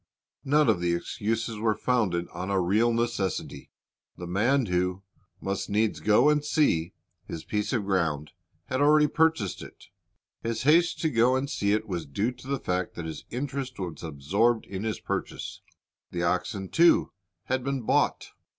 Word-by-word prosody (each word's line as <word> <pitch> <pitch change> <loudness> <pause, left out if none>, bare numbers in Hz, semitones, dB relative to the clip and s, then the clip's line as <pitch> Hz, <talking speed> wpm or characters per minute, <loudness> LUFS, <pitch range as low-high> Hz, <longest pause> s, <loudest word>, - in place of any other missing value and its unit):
None 150 +2 +3
of - - +3
the 85 -1 +1
excuses 110 +4 -2
were 110 -1 +1
founded 100 -10 0
on 95 +2 -5
a 100 -1 +2
real 105 +7 +3
necessity. 115 -6 -2 0.5
The 90 - -6
man 115 +9 +2
who 90 0 -1 0.4
"must 100 +1 -3
needs 105 +1 +1
go 110 +6 +4
and 150 -1 +1
see" 95 - +1 0.3
his 80 - -6
piece 105 0 -2
of 115 -6 0
ground, 80 -6 0 0.3
had 130 +6 -2
already 150 +1 +6
purchased 160 - +1
it. - - -13 0.5
His 115 0 -2
haste 165 +5 +4
to 160 - +2
go 120 +2 +4
and 130 +2 -1
see 100 -7 0
it 110 +1 -1
was 85 -6 -4
due 100 - -1
to 125 +1 -14
the 140 0 0
fact 90 -3 -2
that 85 - -5
his 80 -2 -7
interest 130 0 -4
was 85 -6 -5
absorbed 95 - +1
in 100 +2 -5
his 110 - -2
purchase. - - -4 0.5
The 85 -1 -3
oxen, 95 +2 -1
too, 170 +1 +4 0.3
had 130 +3 -1
been 135 -2 -2
bought. - - +1
110 Hz, 170 wpm, -27 LUFS, 90-130 Hz, 0.5 s, already